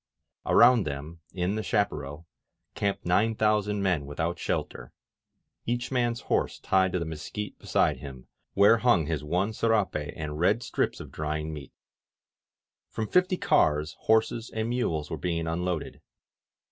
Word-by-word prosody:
Around 120 -7 +6
them, 75 +4 -6
in 90 +1 -1
the 110 - -2
chaparral, 75 -8 -2 0.5
camped 100 -1 -2
nine 105 +6 +2
thousand 105 -1 +1
men 90 -7 0
without 80 +4 -3
shelter, - - -3 0.8
each 120 +1 -2
man's 120 -2 0
horse - - 0
tied 95 -1 +2
to - - +1
the 85 - -2
mesquite 80 +6 -6
beside - - +1
him, 65 -3 -10 0.3
where 105 +3 +6
hung 110 -11 +3
his 75 -2 -2
one 90 +8 0
serape 105 -10 0
and 75 -1 -5
red 105 +7 +2
strips - - -1
of - - -9
drying 75 0 -3
meat. 70 -3 -9 1.2
From 110 - -3
fifty 180 - +2
cars 75 - +2
horses 110 +1 +1
and 110 +1 -3
mules 80 -12 -1
were - - -2
being 85 -2 -2
unloaded. 85 0 -3
90 Hz, 145 wpm, -27 LUFS, 75-110 Hz, 1.2 s, Around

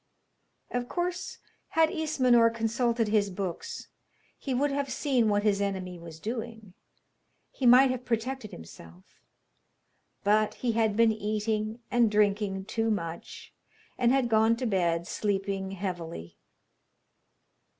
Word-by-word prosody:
Of 245 0 -3
course, 360 +1 -3 0.4
had 320 -1 +5
Ismenor 255 -7 +3
consulted 230 0 0
his 210 -2 +2
books 185 -2 -5 0.5
he 275 - -6
would 275 +3 +1
have 275 -1 -2
seen 255 -5 +1
what 205 0 +1
his 200 -2 +2
enemy 185 -3 -3
was 165 -1 -11
doing, 225 -2 -6 0.8
he 260 - 0
might 255 +2 +7
have 255 -1 -4
protected 240 0 -2
himself; 85 - -14 1.0
but 210 +1 +2
he 245 - -1
had 220 -2 +1
been 230 -1 +5
eating 215 +1 -2
and 240 -2 +4
drinking 205 -2 +1
too 225 +2 -1
much, 170 -5 -5 0.4
and 240 -1 +2
had 265 -2 +2
gone 225 0 +3
to 250 - -4
bed, 170 -5 +1
sleeping 195 -1 -2
heavily. 175 - -6
220 Hz, 125 wpm, -28 LUFS, 195-245 Hz, 1.0 s, might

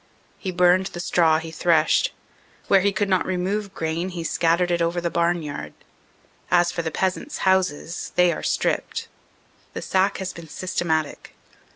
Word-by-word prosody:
He 190 - -4
burned 180 +1 +3
the 175 - -8
straw 165 -2 +3
he 160 0 -6
threshed. 160 -1 +2 0.6
Where 195 - +5
he 200 +2 +2
could 200 +1 0
not 185 -2 +2
remove 190 +2 -2
grain 165 +3 -2
he 175 -2 -5
scattered 170 +2 +1
it 170 0 +1
over 170 +1 0
the 170 -1 -2
barnyard. 165 - -1 0.8
As 175 0 +3
for 170 - -2
the 165 - -2
peasants 190 - -2
houses, 185 -3 0
they 180 -1 +5
are - - -6
stripped. - - -1 0.6
The - - -5
sack 190 +1 +1
has 190 -1 -4
been 170 -1 -10
systematic. 160 -3 -2
175 Hz, 160 wpm, -23 LUFS, 165-185 Hz, 0.8 s, Where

